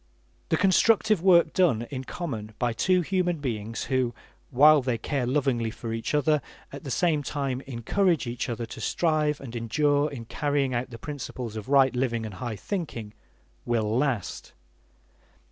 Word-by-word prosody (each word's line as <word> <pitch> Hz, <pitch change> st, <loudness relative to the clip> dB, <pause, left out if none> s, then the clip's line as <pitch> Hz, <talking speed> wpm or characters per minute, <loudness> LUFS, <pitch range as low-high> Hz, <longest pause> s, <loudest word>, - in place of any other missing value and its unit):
The 160 Hz, -, +2 dB
constructive 205 Hz, +1 st, +4 dB
work 170 Hz, -3 st, +5 dB
done 155 Hz, -12 st, +3 dB
in 130 Hz, -1 st, -5 dB
common 110 Hz, -12 st, -5 dB
by 120 Hz, -2 st, 0 dB
two 185 Hz, +9 st, +2 dB
human 180 Hz, -1 st, 0 dB
beings 115 Hz, -5 st, -4 dB
who, 130 Hz, -3 st, 0 dB, 0.3 s
while 150 Hz, +3 st, +6 dB
they 125 Hz, -2 st, -1 dB
care 125 Hz, +2 st, -2 dB
lovingly 130 Hz, -4 st, +1 dB
for 115 Hz, 0 st, -6 dB
each 115 Hz, +6 st, -2 dB
other, 150 Hz, 0 st, +2 dB, 0.3 s
at 140 Hz, -, -9 dB
the 140 Hz, -, -6 dB
same 155 Hz, +2 st, +1 dB
time 135 Hz, -3 st, -3 dB
encourage 155 Hz, -, +1 dB
each 120 Hz, +1 st, -3 dB
other 120 Hz, 0 st, -3 dB
to 115 Hz, -, -9 dB
strive 155 Hz, -3 st, +1 dB
and 125 Hz, -3 st, -9 dB
endure 145 Hz, +6 st, +1 dB
in 120 Hz, -5 st, -8 dB
carrying 140 Hz, 0 st, 0 dB
out 120 Hz, +2 st, -2 dB
the 115 Hz, -, -9 dB
principles 130 Hz, -4 st, -6 dB
of 110 Hz, +2 st, -6 dB
right 135 Hz, -2 st, +4 dB
living 120 Hz, -3 st, -1 dB
and 105 Hz, -, -6 dB
high 120 Hz, -3 st, -3 dB
thinking, 120 Hz, -, -5 dB, 0.5 s
will 110 Hz, -2 st, 0 dB
last. 130 Hz, -6 st, -2 dB
135 Hz, 160 wpm, -26 LUFS, 115-155 Hz, 0.5 s, while